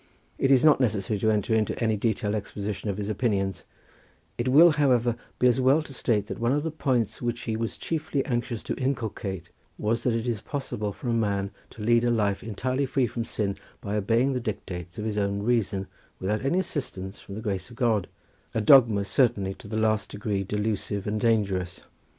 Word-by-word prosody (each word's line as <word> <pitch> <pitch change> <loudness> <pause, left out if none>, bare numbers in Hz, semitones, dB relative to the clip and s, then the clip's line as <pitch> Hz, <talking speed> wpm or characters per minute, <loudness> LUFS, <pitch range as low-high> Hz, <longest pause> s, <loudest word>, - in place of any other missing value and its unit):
It 135 - +2
is 135 +1 +5
not 150 -3 +6
necessary 110 -4 0
to 110 - +2
enter 110 +2 +1
into 110 -1 +1
any 110 -2 +1
detailed 105 -1 0
exposition 105 0 -4
of 100 - -2
his 105 -1 -3
opinions; 100 -4 -1 0.7
it 120 - -2
will, 160 +7 +8
however, 125 -6 +2 0.2
be - - +1
as 125 +1 +4
well 135 +5 +4
to 145 - -10
state 110 -5 +1
that - - -6
one 120 +1 +1
of 145 +1 0
the 160 - -2
points 125 -8 0
which 120 -1 -2
he 110 - -2
was 115 0 -3
chiefly 150 -4 -2
anxious 120 -3 -2
to - - -2
inculcate 105 -9 -3 0.3
was 115 +2 0
that 120 -2 +1
it 115 +1 -2
is 115 -4 -1
possible 130 -7 -3
for 125 +6 -8
a - - +2
man 100 -3 0 0.2
to 110 - -9
lead 120 +1 +4
a 120 - +2
life 105 -4 +1
entirely 130 +5 -1
free 130 0 +2
from 120 0 -3
sin 100 -4 -2 0.2
by 100 +1 -4
obeying 115 +6 +2
the 125 - -1
dictates 90 -6 -5
of 105 - -4
his 105 -1 -1
own 100 0 -1
reason 105 -5 +1 0.3
without 105 +5 -1
any 140 +7 +1
assistance 110 - -3
from 100 - -9
the 110 - -5
grace 100 -4 -3
of 120 - -12
God—a 110 -1 -2
dogma 110 -3 +6
certainly 100 -6 +2
to 105 - -13
the 110 +1 -3
last 110 -1 +1
degree 100 -1 -2
delusive 105 0 -2
and 105 0 -1
dangerous. 100 -6 +1
110 Hz, 200 wpm, -26 LUFS, 100-125 Hz, 0.7 s, will